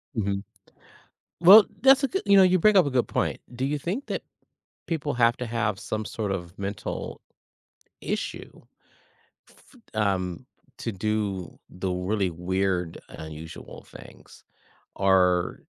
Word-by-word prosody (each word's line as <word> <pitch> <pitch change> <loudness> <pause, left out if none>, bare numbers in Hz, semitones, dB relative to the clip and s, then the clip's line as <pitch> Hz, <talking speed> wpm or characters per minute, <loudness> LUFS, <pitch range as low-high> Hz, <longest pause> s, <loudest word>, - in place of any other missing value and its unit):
Mhm. 100 -2 -1 1.0
Well, 200 +5 +10 0.2
that's 270 +1 +6
a 275 - +2
g 385 - -1
you 200 -1 +6
know, 195 - +8
you 185 0 +4
bring 215 +4 +4
up 180 -6 +6
a - - -1
good 125 -2 +1
point. - - -1
Do 130 +2 -3
you 145 +2 -1
think 195 - -4
that - - -3 0.7
people 150 -3 -2
have 120 -1 +3
to 125 - -4
have 110 -4 -1
some 110 0 -4
sort 105 -4 -3
of 85 -2 -5
mental 100 +1 -5 0.8
issue, - - -5 1.1
f - - -19 0.2
um, 95 +2 -1 0.3
to 115 - -4
do 100 -2 -3
the 90 +1 -4
really 90 +1 -1
weird, 90 0 -2
unusual 80 0 -10
things - - -15 0.5
or 90 -2 +2
105 Hz, 135 wpm, -26 LUFS, 95-140 Hz, 1.1 s, Well